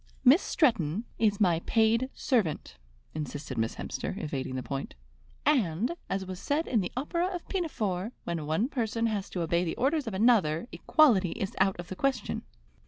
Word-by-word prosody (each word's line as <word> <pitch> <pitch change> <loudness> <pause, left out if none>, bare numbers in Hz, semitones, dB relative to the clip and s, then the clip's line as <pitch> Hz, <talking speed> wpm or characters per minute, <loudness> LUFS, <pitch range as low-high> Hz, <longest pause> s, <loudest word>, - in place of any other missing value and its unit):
"Miss 280 +9 +8
Stretton 220 - +1
is 210 -3 +2
my 175 -5 +3
paid 230 +3 +3
servant," 195 - 0 0.4
insisted 145 -2 -5
Miss 115 0 -1
Hemster, - - -4
evading 140 -8 -3
the 130 - -3
point; 135 -1 -5 0.5
"and, 240 - +2
as 195 0 -1
was 185 -1 -6
said 300 +8 0
in 225 -5 +2
the 180 - -4
opera 340 +6 0
of 360 -2 -5
'Pinafore,' 220 - -2
when 165 -3 -3
one 160 +10 +1
person 230 -4 -1
has 210 -4 -1
to 175 - -2
obey 170 +1 +1
the 165 - -2
orders 285 +1 +1
of 215 - -3
another, 190 -5 +3
equality 220 - +4
is 200 -4 -4
out 190 -2 +2
of 175 - -7
the 190 - -5
question." 275 +6 -1
205 Hz, 170 wpm, -29 LUFS, 170-255 Hz, 0.5 s, Miss